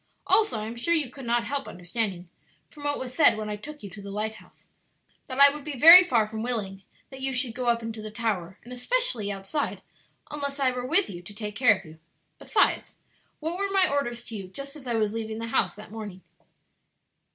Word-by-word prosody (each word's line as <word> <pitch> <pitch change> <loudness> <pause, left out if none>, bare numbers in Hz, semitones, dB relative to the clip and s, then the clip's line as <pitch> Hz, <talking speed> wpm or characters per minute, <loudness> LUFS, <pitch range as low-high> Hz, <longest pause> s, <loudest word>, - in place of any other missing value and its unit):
Also 430 - +3
I 215 - -4
am 225 +2 -6
sure 335 +9 +1
you 290 -7 -1
could 265 -2 -10
not 235 0 +2
help 280 +2 -3
understanding, 180 0 -4 0.4
from 290 -2 -11
what 290 0 0
was 255 -1 -6
said 295 -5 +5
when 215 -1 -4
I - - -2
took 295 +7 -10
you 200 - -7
to 205 +2 -10
the 200 - -9
lighthouse, 215 +2 -6 0.6
that 260 0 -5
I 280 0 +8
would 295 -1 -8
be 295 -2 -6
very 335 +7 +11
far 235 -11 +2
from 220 0 -6
willing 210 -5 -2 0.3
that 265 0 -9
you 270 0 -1
should 250 -2 0
go 250 +1 -4
up 235 -1 +2
into 225 -1 -5
the 215 - -6
tower, 210 -5 -3
and 245 +2 -10
especially 250 - 0
outside, 195 +10 -3 0.5
unless 285 -1 -4
I 265 -2 +3
were 250 0 -4
with 355 +7 +3
you 175 -2 -8
to 200 +3 -10
take 210 -1 -5
care 225 -3 +5
of 195 - -14
you. 160 0 -14 0.4
Besides, - - +1 0.4
what 330 +4 -3
were 400 0 0
my 385 -2 +4
orders 240 -4 -2
to 225 - -6
you 195 -3 -6
just 275 +10 -8
as 275 -4 -11
I 240 - -1
was 215 -1 0
leaving 220 -1 -4
the 230 0 -5
house - - +1
that 210 0 -11
morning?" 210 -4 -8
235 Hz, 225 wpm, -26 LUFS, 210-280 Hz, 0.6 s, very